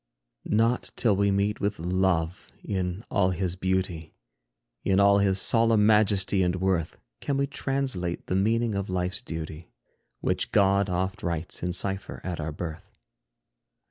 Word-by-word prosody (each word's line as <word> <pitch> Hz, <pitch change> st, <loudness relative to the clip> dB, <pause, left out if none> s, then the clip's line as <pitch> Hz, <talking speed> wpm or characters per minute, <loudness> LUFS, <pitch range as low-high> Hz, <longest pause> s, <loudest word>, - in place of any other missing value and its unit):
Not 115 Hz, +3 st, +2 dB
till 110 Hz, -5 st, +3 dB
we 100 Hz, +1 st, +2 dB
meet 100 Hz, +2 st, +1 dB
with 105 Hz, +1 st, -1 dB
Love 90 Hz, 0 st, 0 dB, 0.2 s
in 95 Hz, +1 st, -3 dB
all 95 Hz, -2 st, +3 dB
his 90 Hz, -1 st, -2 dB
beauty, 95 Hz, -4 st, -2 dB, 0.7 s
In 95 Hz, 0 st, +2 dB
all 100 Hz, 0 st, +5 dB
his 95 Hz, -1 st, +2 dB
solemn 115 Hz, -1 st, +3 dB
majesty 100 Hz, -2 st, +3 dB
and 90 Hz, -1 st, +1 dB
worth, 90 Hz, -3 st, -1 dB, 0.2 s
Can 140 Hz, -, -1 dB
we 140 Hz, -, +2 dB
translate 135 Hz, -11 st, -2 dB
the 90 Hz, -, -1 dB
meaning 115 Hz, +3 st, +1 dB
of 100 Hz, 0 st, -3 dB
life's 90 Hz, 0 st, -2 dB
duty, 80 Hz, 0 st, -7 dB, 0.5 s
Which -, -, -1 dB
God 100 Hz, 0 st, +3 dB
oft 95 Hz, +1 st, -2 dB
writes 85 Hz, -1 st, -3 dB
in 90 Hz, -, -1 dB
cypher 95 Hz, +2 st, -2 dB
at 90 Hz, -2 st, -4 dB
our 80 Hz, +1 st, -3 dB
birth. 85 Hz, +5 st, -7 dB
95 Hz, 145 wpm, -27 LUFS, 90-105 Hz, 0.7 s, all